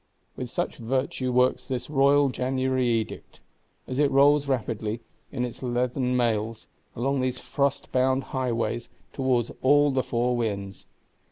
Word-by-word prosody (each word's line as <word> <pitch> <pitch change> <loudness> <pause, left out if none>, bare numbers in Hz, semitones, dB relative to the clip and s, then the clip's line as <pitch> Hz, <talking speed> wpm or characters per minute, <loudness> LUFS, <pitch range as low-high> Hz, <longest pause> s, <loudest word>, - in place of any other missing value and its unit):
With - - -5
such - - -3
virtue 130 +1 -1
works 125 +1 +2
this 125 -2 -3
Royal 140 -1 +4
January 130 0 0
Edict; 115 -2 -2 0.5
as 130 +1 -4
it 145 -1 +4
rolls 140 +1 +4
rapidly, 115 -4 -2 0.3
in 125 -2 -1
its 120 - -8
leathern 125 0 0
mails, 115 -2 0 0.3
along 135 +3 0
these 130 0 -1
frostbound 130 -1 0
highways, 120 -2 -1 0.2
towards 130 -4 0
all 145 +2 +5
the 130 -1 +1
four 125 0 0
winds. 100 -4 -3
125 Hz, 135 wpm, -26 LUFS, 120-135 Hz, 0.5 s, all